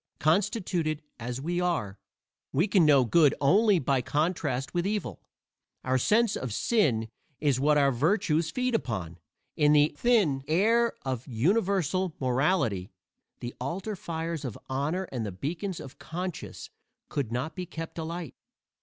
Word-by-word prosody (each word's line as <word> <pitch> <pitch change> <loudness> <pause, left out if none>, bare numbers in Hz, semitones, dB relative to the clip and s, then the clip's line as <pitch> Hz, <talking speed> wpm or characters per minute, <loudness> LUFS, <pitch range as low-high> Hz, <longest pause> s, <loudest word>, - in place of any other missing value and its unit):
Constituted 170 -3 0 0.2
as 120 +2 -4
we 175 +5 -1
are, 130 - -1 0.5
we 165 +9 +2
can 190 -6 +4
know 140 -4 +6
good 150 +4 +4
only 200 +8 +4
by 135 -4 +1
contrast 145 -2 -1
with 175 +1 0
evil. 210 0 -3 0.6
Our 130 0 +1
sense 220 - +3
of 125 - -4
sin 130 - +2 0.3
is 140 -4 +1
what 150 +2 +3
our 140 -1 +4
virtues 160 - +1
feed 250 +6 -1
upon; 95 - -3 0.4
in 150 -1 +4
the 150 0 +4
thin 200 - +2
air 225 +8 +3
of 130 -1 -3
universal 185 - +1
morality 125 - +1 0.5
the 120 0 -5
altar 185 +10 -3
fires 165 -3 -4
of 125 -6 -5
honor 145 +8 -1
and 125 -4 -3
the 105 - -3
beacons 165 - -4
of 135 - -10
conscience 180 0 -6 0.4
could 135 -6 -3
not 130 +6 -3
be 180 -1 -5
kept 165 -1 -7
alight. 165 -2 -5
155 Hz, 145 wpm, -28 LUFS, 130-185 Hz, 0.6 s, know